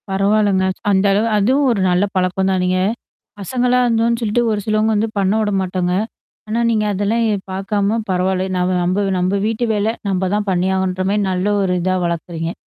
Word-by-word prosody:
பரவால்லங்க, 195 0 +2 0.3
அந்த 190 0 +2
அளவு 210 +3 +2
அதுவும் 260 +7 +2
ஒரு 210 -5 0
நல்ல 180 +2 +2
பழக்கம்தானேங்க. 185 0 0
நீங்க 185 - +1 0.6
பசங்களா 250 +5 0
இருந்தோம்ன்னு 230 0 +1
சொல்லிட்டு 230 +2 +1
ஒரு 210 - -1
சிலவங்க 215 0 +1
வந்து 220 +2 0
பண்ண 195 0 +2
விட 210 -1 0
மாட்டாங்க. 180 -1 -1 0.5
ஆனா, 220 +2 -1
நீங்க 215 -2 +1
அதெல்லாம் 205 +4 0
எ - - +1 0.2
பாக்காம 200 +3 -1
பரவால்ல. 185 0 0
நம் 180 +1 0
நம்ப 185 +3 0
நம்ப 185 +2 0
வீட்டு 225 +2 -1
வேல, 210 +2 0 0.2
நம்ப 190 -1 0
தான் 210 0 -2
பண்ணியாகனுன்ற 185 0 0
மாரி 210 0 +1
நல்ல 185 +1 -1 0.2
ஒரு 185 -2 0
இதா 185 +1 +1
வளர்க்குறீங்க. 170 0 -3
195 Hz, 170 wpm, -18 LUFS, 185-215 Hz, 0.6 s, பரவால்லங்க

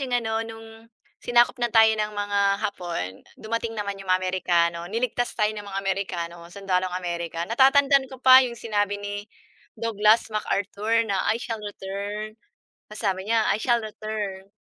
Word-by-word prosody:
'yong 255 -2 -2
ano, 225 -2 -1
no'ng, 225 0 -10 0.3
sinakop 240 +1 +3
na 240 - +2
tayo 220 -1 +6
ng 210 0 -1
mga 205 0 -1 0.2
Hapon, 170 - -4 0.2
dumating 230 +1 -3
naman 200 -1 -3
'yong 195 - -11
mga 185 0 +4
Amerikano. 175 -2 +1
Niligtas 240 +3 -1
tayo 210 -1 +2
ng 210 -1 -8
mga 195 -1 -4
Amerikano, 175 -3 -3
sundalong 185 -1 -2
America. 170 -2 -3
Natatandaan 270 +5 +4
ko 265 - -10
pa 260 0 +9
'yong 240 -2 -2
sinabi 205 -2 -1
ni 205 0 -5 0.6
Douglas 220 0 +2
MacArthur 215 +2 0
na, 195 -3 -1
"I 220 - +3
shall 225 -2 -5
return", 205 +2 -6 0.5
tas 210 - -8
sabi 190 -1 -1
niya, 225 -1 +2
"I 200 - -1
shall 235 0 +1
return". 210 -3 -5
210 Hz, 160 wpm, -25 LUFS, 195-225 Hz, 0.6 s, pa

